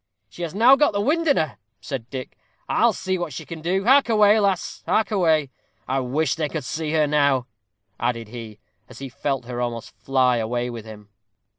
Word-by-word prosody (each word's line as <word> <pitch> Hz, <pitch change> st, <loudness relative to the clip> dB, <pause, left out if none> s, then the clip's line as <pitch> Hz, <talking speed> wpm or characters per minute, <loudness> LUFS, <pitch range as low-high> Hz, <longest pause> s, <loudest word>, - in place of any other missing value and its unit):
"She -, -, -11 dB
has 170 Hz, 0 st, -4 dB
now 240 Hz, +6 st, +7 dB
got 290 Hz, -6 st, +2 dB
her -, -, +1 dB
wind 320 Hz, +8 st, +1 dB
in 285 Hz, -, +4 dB
her," 155 Hz, -5 st, -1 dB, 0.2 s
said 120 Hz, -4 st, -6 dB
Dick; 130 Hz, -2 st, -7 dB, 0.3 s
"I'll -, -, +3 dB
see 185 Hz, -1 st, -3 dB
what 175 Hz, -5 st, -4 dB
she -, -, -7 dB
can 165 Hz, -2 st, -8 dB
do 185 Hz, +4 st, 0 dB
hark 270 Hz, +1 st, +5 dB
away, 210 Hz, -1 st, +5 dB
lass 195 Hz, -3 st, -1 dB
hark 220 Hz, +1 st, +1 dB
away! 160 Hz, -8 st, +2 dB, 0.4 s
I 135 Hz, +1 st, 0 dB
wish 135 Hz, +3 st, 0 dB
they 155 Hz, -3 st, -2 dB
could 155 Hz, -2 st, -4 dB
see 155 Hz, +3 st, -3 dB
her 155 Hz, -1 st, +3 dB
now," 140 Hz, -4 st, +2 dB, 0.5 s
added 115 Hz, -2 st, -2 dB
he, 115 Hz, -3 st, -9 dB, 0.3 s
as -, -, -13 dB
he 135 Hz, -1 st, -7 dB
felt 135 Hz, 0 st, -3 dB
her 120 Hz, 0 st, -4 dB
almost 120 Hz, -2 st, -4 dB
fly 130 Hz, -2 st, +2 dB
away 120 Hz, +2 st, -2 dB
with 115 Hz, -2 st, -8 dB
him. 105 Hz, -2 st, -12 dB
145 Hz, 200 wpm, -23 LUFS, 125-190 Hz, 0.5 s, now